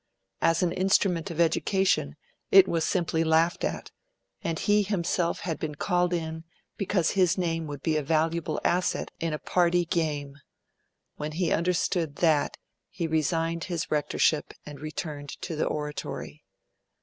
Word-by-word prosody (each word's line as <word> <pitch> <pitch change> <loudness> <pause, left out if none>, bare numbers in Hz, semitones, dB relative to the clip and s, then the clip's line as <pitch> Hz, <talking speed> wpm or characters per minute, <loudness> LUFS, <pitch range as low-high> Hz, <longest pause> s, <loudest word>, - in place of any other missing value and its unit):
As 165 +2 +3
an 175 - +2
instrument 185 -1 +2
of 170 -1 -6
education, 170 - +2 0.3
it 190 -1 +8
was 165 -1 0
simply 165 -2 +1
laughed 160 +1 +2
at; - - -3 0.5
and 165 -1 -2
he 210 +4 +3
himself 180 -3 -1
had 165 -3 -3
been 150 -2 -4
called 180 +3 +1
in 160 -2 -3 0.3
because 185 -4 +1
his 185 -3 +3
name 165 -3 -1
would 145 -2 -7
be 160 -2 +1
a - - +1
valuable 160 +2 0
asset 180 +1 +1
in 165 -1 -1
a 150 - -1
party 175 +1 +2
game. 150 -4 -2 0.8
When 150 +1 -4
he 170 +1 0
understood 170 -2 0
that, 155 -3 +2 0.3
he 170 - -3
resigned 165 +1 0
his 175 -2 -3
rectorship 150 0 +1
and 145 -2 -9
returned 150 -1 -6
to 165 - -3
the 155 - 0
Oratory. 150 - -5
165 Hz, 150 wpm, -27 LUFS, 155-175 Hz, 0.8 s, it